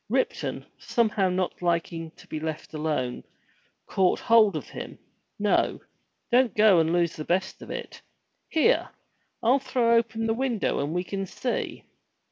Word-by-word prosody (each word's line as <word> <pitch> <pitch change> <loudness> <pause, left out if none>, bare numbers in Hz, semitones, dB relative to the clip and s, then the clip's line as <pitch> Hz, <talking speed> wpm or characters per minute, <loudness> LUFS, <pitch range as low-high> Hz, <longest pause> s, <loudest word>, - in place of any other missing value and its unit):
Ripton, - - -1
somehow 210 -5 +1
not 180 0 -2
liking 170 -1 -1
to - - -15
be 155 - -5
left 160 0 -5
alone 150 -5 -2 0.6
caught, 185 -2 +2
hold 220 -5 +5
of 150 - -4
him. - - -7 0.4
"No! 205 0 +1 0.5
Don't 245 -1 +4
go 210 -4 +6
and 160 0 +2
lose 170 -1 +1
the 155 - -5
best 190 +4 -1
of - - -10
it. - - -7 0.5
Here, 395 +10 +3 0.5
I'll 250 +5 +4
throw 250 -3 +2
open 225 -1 +1
the 225 - +1
window 240 -3 0
and 145 +4 -2
we 180 - 0
can 195 +1 -4
see." 245 +6 -3
190 Hz, 150 wpm, -26 LUFS, 165-230 Hz, 0.6 s, go